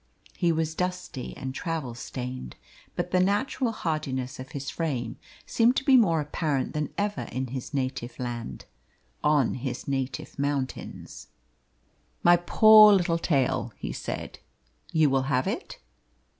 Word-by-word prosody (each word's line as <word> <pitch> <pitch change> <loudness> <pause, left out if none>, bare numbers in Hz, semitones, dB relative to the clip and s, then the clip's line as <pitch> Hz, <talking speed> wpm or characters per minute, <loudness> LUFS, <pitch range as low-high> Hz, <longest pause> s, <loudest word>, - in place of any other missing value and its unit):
He 175 -2 +2
was 160 -1 -1
dusty 180 -7 -4
and 130 0 -5
travel 155 -5 -3
stained, 125 - -6 0.4
but - - -2
the 185 - +3
natural 210 +6 +1
hardiness 150 - -3
of 130 +1 -9
his 140 -1 -5
frame 145 -8 -3 0.3
seemed 235 +2 +3
to - - 0
be 270 -1 +5
more 180 -10 +5
apparent 150 -2 -1
than 150 0 -2
ever 205 0 -1
in 130 +1 -2
his 130 0 -5
native 130 -3 -3
land, 120 - -5 0.6
on 150 -4 +3
his 130 -1 -5
native 135 0 -3
mountains. 140 -2 -4 1.0
"My 175 0 +7
poor 215 +4 +8
little 175 -4 +3
tale," 140 -7 0
he - - -5
said; - - -5 0.5
"you 160 -2 +4
will 135 0 +1
have 130 -2 +2
it?" 225 - -4
150 Hz, 140 wpm, -27 LUFS, 130-180 Hz, 1.0 s, poor